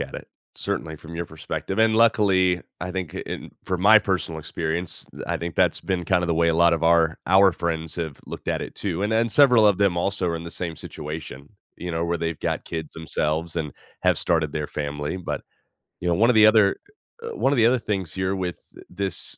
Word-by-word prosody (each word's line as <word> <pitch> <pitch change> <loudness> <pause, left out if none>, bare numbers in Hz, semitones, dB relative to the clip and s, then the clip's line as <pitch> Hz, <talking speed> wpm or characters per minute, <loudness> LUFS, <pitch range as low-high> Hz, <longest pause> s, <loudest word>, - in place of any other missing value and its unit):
at - - -6
it, - - -8 0.3
certainly, 80 -1 -3
from 80 +2 -11
your 85 +1 -4
perspective. 80 +5 -5
And 110 0 +4
luckily, 95 -6 +3 0.2
I 90 - -4
think 90 -3 -4
in - - -6
from 90 -2 -2
my 110 +2 +8
personal 90 -5 -2
experience, 80 +2 -3 0.2
I 85 - -1
think 85 0 -5
that's - - +2
been 90 -2 -2
kind 90 0 +2
of 85 - -2
the 85 - +2
way 85 0 +3
a 80 - +2
lot 85 0 +5
of 80 0 0
our 80 -1 +3
our 95 +1 +6
friends 80 -1 -3
have 80 -5 -4
looked - - -8
at - - -1
it - - -8
too. 95 -2 -3
And 105 - 0
then, 115 +1 +2
several 125 -4 +6
of 100 -2 +3
them 100 -4 +2
also 90 0 0
are 85 - -1
in 85 - -7
the 85 - -7
same 85 -2 -3
situation, 75 -3 -7 0.3
you 90 +1 -5
know, 80 0 -1
where 85 0 -1
they've 85 -1 -3
got - - -2
kids 80 -2 -5
themselves 80 +1 -2
and 75 -4 -3 0.3
have - - +3
started 80 -3 +1
their 75 -1 -2
family. 75 +2 -4
But, 90 - -4 0.6
you 90 - -3
know, 85 - +3
one 115 +8 +3
of 120 - +3
the 110 0 +8
other 110 -2 +5 0.6
one 135 - +1
of - - 0
the 115 - +5
other 125 +1 +4
things 95 -7 -3
here 95 +1 -1
with 90 -2 -3 0.3
this 95 0 -2
85 Hz, 225 wpm, -24 LUFS, 80-95 Hz, 0.6 s, my